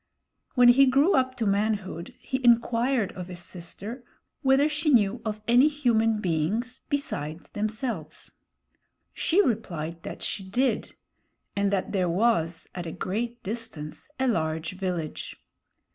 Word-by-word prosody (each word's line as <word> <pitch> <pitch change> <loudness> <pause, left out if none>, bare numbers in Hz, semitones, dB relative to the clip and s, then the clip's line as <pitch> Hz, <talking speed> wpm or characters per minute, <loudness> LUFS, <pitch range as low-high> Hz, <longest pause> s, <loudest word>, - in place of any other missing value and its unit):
When 245 -1 +7
he 270 +3 +7
grew 280 +8 +4
up 255 -1 +2
to 230 - -2
manhood, 200 -4 -1
he 260 0 -4
inquired 235 -1 +3
of 180 -1 -7
his 180 -1 -8
sister 195 +7 -7 0.4
whether 270 +1 +4
she 305 +1 0
knew 230 -3 +3
of 215 -2 -3
any 245 +5 +6
human 230 -7 +2
beings 205 +9 -1
besides 160 - -3
themselves. 210 - -4 0.8
She 385 +5 +3
replied 170 -8 -2
that - - -7
she 195 - -2
did; 245 +8 0 0.6
and 200 0 +2
that 195 -2 -1
there 185 -3 +1
was, 170 -4 +1
at 175 -2 -5
a - - -4
great 230 +8 -3
distance, 210 - -5
a 265 - +2
large 160 -7 0
village. 180 -5 -4
215 Hz, 135 wpm, -27 LUFS, 180-250 Hz, 0.8 s, When